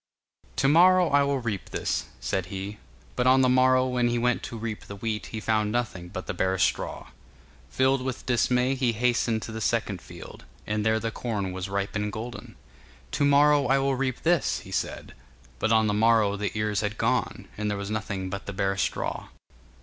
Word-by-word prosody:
'To -, -, +2 dB
morrow 180 Hz, +3 st, +6 dB
I 145 Hz, 0 st, +4 dB
will 140 Hz, 0 st, +1 dB
reap 110 Hz, -7 st, -4 dB
this,' -, -, -2 dB
said 85 Hz, +10 st, -2 dB
he; 100 Hz, +2 st, -6 dB, 0.4 s
but 125 Hz, 0 st, +1 dB
on 130 Hz, +1 st, +6 dB
the 130 Hz, -, +4 dB
morrow 130 Hz, 0 st, +4 dB
when 125 Hz, -1 st, +1 dB
he 120 Hz, 0 st, 0 dB
went 125 Hz, 0 st, +1 dB
to 115 Hz, -, -6 dB
reap 110 Hz, -1 st, -5 dB
the 100 Hz, -, -8 dB
wheat 105 Hz, +1 st, -3 dB
he 110 Hz, -, -5 dB
found 110 Hz, -1 st, 0 dB
nothing 110 Hz, -7 st, -2 dB
but -, -, -7 dB
the -, -, -3 dB
bare 95 Hz, 0 st, 0 dB
straw. 95 Hz, -, -1 dB, 0.6 s
Filled 130 Hz, 0 st, +2 dB
with 130 Hz, -1 st, -4 dB
dismay 125 Hz, +1 st, +2 dB
he 125 Hz, -3 st, +1 dB
hastened 115 Hz, -1 st, +1 dB
to -, -, -6 dB
the 110 Hz, 0 st, -5 dB
second 105 Hz, -5 st, -1 dB
field, 90 Hz, -1 st, -11 dB, 0.2 s
and 105 Hz, 0 st, -1 dB
there 110 Hz, 0 st, +2 dB
the 115 Hz, 0 st, -3 dB
corn 105 Hz, -5 st, -3 dB
was 95 Hz, +1 st, -5 dB
ripe 100 Hz, +1 st, -2 dB
and 105 Hz, 0 st, -1 dB
golden. 115 Hz, +3 st, -7 dB, 0.6 s
'To 145 Hz, -, +1 dB
morrow 145 Hz, 0 st, +5 dB
I 135 Hz, +2 st, +4 dB
will 135 Hz, 0 st, +1 dB
reap 130 Hz, -1 st, -2 dB
this,' 170 Hz, -2 st, +2 dB
he -, -, -12 dB
said, -, -, -3 dB, 0.5 s
but 110 Hz, -, +1 dB
on 110 Hz, -1 st, +4 dB
the 105 Hz, -, +1 dB
morrow 110 Hz, -1 st, +3 dB
the 105 Hz, +1 st, -3 dB
ears 105 Hz, -1 st, 0 dB
had 105 Hz, 0 st, -3 dB
gone, -, -, -1 dB
and 105 Hz, 0 st, -2 dB
there 105 Hz, -, -2 dB
was 100 Hz, +1 st, -5 dB
nothing 100 Hz, -4 st, -3 dB
but 100 Hz, +1 st, -6 dB
the 100 Hz, -, -4 dB
bare 95 Hz, 0 st, 0 dB
straw. -, -, -2 dB
110 Hz, 205 wpm, -26 LUFS, 100-130 Hz, 0.6 s, morrow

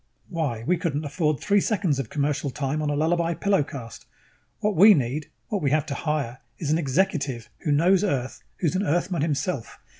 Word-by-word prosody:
Why, 150 Hz, -, -2 dB
we 180 Hz, +3 st, +2 dB
couldn't 155 Hz, -3 st, -2 dB
afford 150 Hz, -2 st, 0 dB
three 200 Hz, -, +3 dB
seconds 185 Hz, -, 0 dB
of 125 Hz, -5 st, -3 dB
commercial 145 Hz, 0 st, -1 dB
time 140 Hz, +2 st, -2 dB
on 150 Hz, -, -1 dB
a 145 Hz, -, 0 dB
Lullaby 170 Hz, +2 st, +1 dB
Pillow 195 Hz, +1 st, +2 dB
'cast. 125 Hz, -5 st, -8 dB, 0.5 s
What 210 Hz, -1 st, 0 dB
we 205 Hz, +4 st, +8 dB
need, 140 Hz, +2 st, -2 dB, 0.2 s
what 210 Hz, -4 st, -1 dB
we 140 Hz, -, +2 dB
have 150 Hz, +1 st, +2 dB
to 145 Hz, -, -4 dB
hire, 140 Hz, -6 st, -2 dB, 0.2 s
is 150 Hz, -4 st, -2 dB
an 160 Hz, -, +3 dB
executive 140 Hz, -, 0 dB
who 150 Hz, -, +2 dB
knows 180 Hz, +6 st, +4 dB
Earth, 135 Hz, -10 st, -2 dB, 0.2 s
who's 170 Hz, -1 st, 0 dB
an 185 Hz, -, +1 dB
Earthman 175 Hz, -2 st, 0 dB
himself. 145 Hz, -3 st, -2 dB
155 Hz, 190 wpm, -25 LUFS, 140-175 Hz, 0.5 s, we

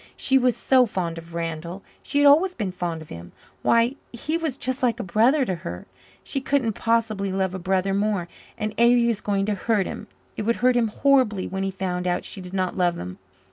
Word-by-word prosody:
She 265 Hz, 0 st, +3 dB
was 250 Hz, -2 st, +2 dB
so 255 Hz, -2 st, +4 dB
fond 170 Hz, -5 st, -3 dB
of 165 Hz, 0 st, -12 dB
Randall 170 Hz, +2 st, -4 dB, 0.2 s
she -, -, -3 dB
had 290 Hz, -, +5 dB
always 330 Hz, +6 st, +5 dB
been 205 Hz, -5 st, -3 dB
fond 170 Hz, -3 st, -4 dB
of 155 Hz, -, -18 dB
him 85 Hz, +1 st, -10 dB, 0.3 s
why, 235 Hz, +4 st, +3 dB
he 290 Hz, +7 st, -3 dB
was 320 Hz, -6 st, -2 dB
just 260 Hz, +1 st, -3 dB
like 245 Hz, -2 st, +1 dB
a -, -, -2 dB
brother 235 Hz, -, +3 dB
to 190 Hz, -, -1 dB
her! 90 Hz, -, -7 dB, 0.4 s
She 275 Hz, -, -3 dB
couldn't 265 Hz, -5 st, 0 dB
possibly 220 Hz, -3 st, 0 dB
love 190 Hz, -1 st, -1 dB
a 190 Hz, -, -4 dB
brother 190 Hz, +1 st, 0 dB
more. 200 Hz, -3 st, 0 dB, 0.3 s
And 215 Hz, -1 st, -3 dB
Avery 240 Hz, 0 st, +5 dB
was 230 Hz, -3 st, 0 dB
going 200 Hz, -1 st, 0 dB
to 210 Hz, -, 0 dB
hurt 205 Hz, 0 st, 0 dB
him; 215 Hz, -, -7 dB, 0.3 s
it -, -, -2 dB
would 230 Hz, +2 st, +1 dB
hurt 255 Hz, -1 st, +5 dB
him 235 Hz, -2 st, +3 dB
horribly 230 Hz, -4 st, +2 dB
when 190 Hz, 0 st, -4 dB
he 195 Hz, -, 0 dB
found 180 Hz, -1 st, -3 dB
out 180 Hz, -, -1 dB
she 195 Hz, -, -5 dB
did 180 Hz, -1 st, -9 dB
not 185 Hz, -1 st, -1 dB
love 175 Hz, -2 st, +1 dB
him. 90 Hz, +1 st, -7 dB
205 Hz, 220 wpm, -24 LUFS, 180-245 Hz, 0.4 s, had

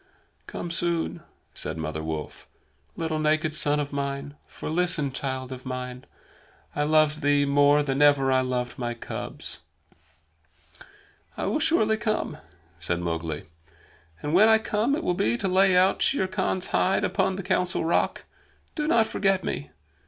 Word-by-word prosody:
"Come 175 Hz, -, -5 dB
soon," 170 Hz, 0 st, -1 dB, 0.3 s
said -, -, -5 dB
Mother 80 Hz, -1 st, -3 dB
Wolf, 80 Hz, -1 st, -6 dB, 0.5 s
"little 160 Hz, -1 st, -2 dB
naked 155 Hz, 0 st, +1 dB
son 150 Hz, -1 st, +1 dB
of 145 Hz, -1 st, -3 dB
mine. 140 Hz, 0 st, -3 dB
For, -, -, -8 dB
listen, 165 Hz, -3 st, 0 dB
child 130 Hz, -1 st, -4 dB
of 130 Hz, -1 st, -7 dB
man, 125 Hz, -1 st, -6 dB, 0.7 s
I 150 Hz, -, 0 dB
loved 155 Hz, 0 st, +3 dB
thee 145 Hz, -1 st, +3 dB
more 145 Hz, +1 st, +4 dB
than 135 Hz, 0 st, -1 dB
ever 145 Hz, -2 st, +5 dB
I 130 Hz, 0 st, +4 dB
loved 125 Hz, -1 st, -3 dB
my 120 Hz, -1 st, -2 dB
cubs." 115 Hz, -, -7 dB, 1.8 s
"I -, -, -2 dB
will 215 Hz, +9 st, 0 dB
surely 220 Hz, -9 st, +2 dB
come," 215 Hz, -8 st, -2 dB, 0.4 s
said 85 Hz, +1 st, -1 dB
Mowgli. 80 Hz, -3 st, -3 dB, 0.8 s
"And 150 Hz, -, -2 dB
when 210 Hz, +5 st, +6 dB
I 220 Hz, -, +7 dB
come 220 Hz, +4 st, 0 dB
it 325 Hz, -, -4 dB
will 180 Hz, -, +1 dB
be 115 Hz, -8 st, +1 dB
to 195 Hz, -, -1 dB
lay 190 Hz, 0 st, +4 dB
out 185 Hz, +1 st, +3 dB
Shere 190 Hz, -9 st, +2 dB
Khan's 185 Hz, -1 st, -1 dB
hide 190 Hz, -, +2 dB
upon 190 Hz, -1 st, +1 dB
the 195 Hz, -, -5 dB
Council 180 Hz, -2 st, 0 dB
Rock. 170 Hz, -, 0 dB, 0.5 s
Do 300 Hz, -1 st, -2 dB
not 230 Hz, -8 st, +4 dB
forget 195 Hz, -4 st, +1 dB
me! 70 Hz, 0 st, -3 dB
150 Hz, 155 wpm, -26 LUFS, 130-185 Hz, 1.8 s, I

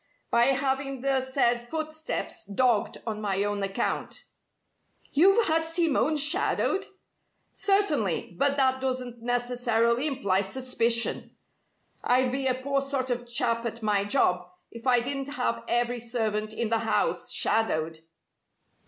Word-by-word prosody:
"By 235 Hz, 0 st, +4 dB
having 270 Hz, 0 st, 0 dB
the 270 Hz, 0 st, +1 dB
said 245 Hz, -2 st, 0 dB
footsteps 315 Hz, +2 st, -4 dB
dogged 230 Hz, +1 st, +1 dB
on 215 Hz, -2 st, -4 dB
my 200 Hz, -1 st, 0 dB
own 205 Hz, 0 st, -2 dB
account." 195 Hz, 0 st, -2 dB, 0.9 s
"You've 390 Hz, +9 st, +5 dB
had 320 Hz, 0 st, +2 dB
Simone 325 Hz, -2 st, +1 dB
shadowed?" 335 Hz, +6 st, +1 dB, 0.7 s
"Certainly. 300 Hz, -, +1 dB
But 280 Hz, +8 st, +1 dB
that 260 Hz, -1 st, +2 dB
doesn't 255 Hz, -2 st, -3 dB
necessarily 245 Hz, +1 st, +1 dB
imply 200 Hz, -10 st, +1 dB
suspicion. 235 Hz, +2 st, 0 dB, 0.7 s
I'd 250 Hz, 0 st, +2 dB
be 265 Hz, +1 st, -1 dB
a 255 Hz, -, +2 dB
poor 275 Hz, +2 st, -1 dB
sort 270 Hz, -2 st, -2 dB
of 245 Hz, 0 st, -3 dB
chap 235 Hz, -1 st, +1 dB
at 230 Hz, -1 st, -5 dB
my 205 Hz, -2 st, +2 dB
job 180 Hz, -6 st, +1 dB, 0.2 s
if 230 Hz, +2 st, -8 dB
I 245 Hz, -1 st, +4 dB
didn't 275 Hz, +2 st, -4 dB
have 115 Hz, 0 st, -1 dB
every 240 Hz, 0 st, 0 dB
servant 220 Hz, -2 st, -2 dB
in 220 Hz, 0 st, -2 dB
the 225 Hz, 0 st, +1 dB
house 225 Hz, 0 st, -1 dB
shadowed." 160 Hz, -8 st, 0 dB
245 Hz, 130 wpm, -27 LUFS, 225-275 Hz, 0.9 s, You've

